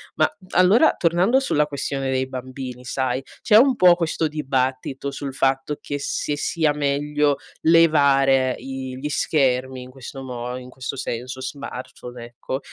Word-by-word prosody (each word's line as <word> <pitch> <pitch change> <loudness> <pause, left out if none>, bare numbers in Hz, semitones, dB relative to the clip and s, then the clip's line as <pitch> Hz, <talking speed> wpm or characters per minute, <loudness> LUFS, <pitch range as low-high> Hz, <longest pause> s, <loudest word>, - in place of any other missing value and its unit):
Ma - - +3 0.3
allora 190 - +5
tornando 180 +9 +3
sulla 150 - +1
questione 135 -2 -3
dei 130 0 0
bambini, 130 -1 -7
sai. 130 0 -1 0.2
C'è 210 - +4
un 260 +2 +5
po' 180 -5 +7
questo 165 -2 -1
dibattito 135 -2 -2
sul 135 -1 -6
fatto 135 +2 0
che 145 0 -5
se 145 +1 -2
sia 155 -1 +1
meglio 145 0 0 0.2
levare 140 -5 +4
i 130 -1 -6
gli 145 +3 -4
schermi 130 -4 0
in 125 - -12
questo 135 +1 -9
mo 125 0 -5
in 125 0 -10
questo 130 +1 -6
senso, 125 0 -5
smartphone 125 -2 -7
ecco, 120 +3 -5
135 Hz, 145 wpm, -22 LUFS, 130-150 Hz, 0.3 s, po